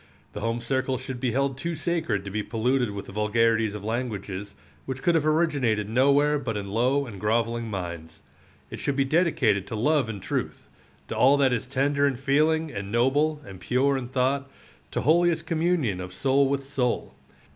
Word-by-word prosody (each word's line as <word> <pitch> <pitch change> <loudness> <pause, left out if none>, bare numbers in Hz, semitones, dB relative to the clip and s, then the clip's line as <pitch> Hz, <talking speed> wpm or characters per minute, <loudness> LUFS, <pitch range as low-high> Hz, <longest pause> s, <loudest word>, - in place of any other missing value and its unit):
The - - -5
home 115 +2 -2
circle 130 +2 -1
should 130 0 -6
be 125 - 0
held 135 +1 0
too 170 +4 -3
sacred 155 - -1
to 100 - -6
be 105 +2 -1
polluted 125 +3 0
with 100 -1 -6
the - - -10
vulgarities 110 +1 +1
of 105 - -7
languages, 105 -4 -4 0.3
which 135 0 -5
could 175 - +3
have 155 -2 +2
originated 140 -10 +1
nowhere 140 +5 +3
but 115 -6 -3
in 100 -1 -5
low 130 +6 +2
and 105 -6 -9
groveling 115 +2 0
minds. 85 -5 -6 0.5
It - - -6
should 140 - -1
be 135 0 +2
dedicated 150 - +2
to 110 - -5
love 135 +2 +2
and 105 -3 -5
truth, 95 - -4 0.4
to - - -3
all 140 +2 +5
that 135 -3 +3
is 120 0 -2
tender 140 +2 +1
in 135 - 0
feeling 155 +4 +1
and 100 0 -6
noble 145 +6 +1
and 95 -2 -10
pure 135 +6 +1
in 130 -2 -3
thought, 135 +2 0 0.4
to - - -2
holiest 170 +2 +3
communion 160 - 0
of 90 0 -7
soul 135 0 +2
with 140 0 -1
soul. 135 -3 -2
130 Hz, 190 wpm, -26 LUFS, 110-140 Hz, 0.5 s, all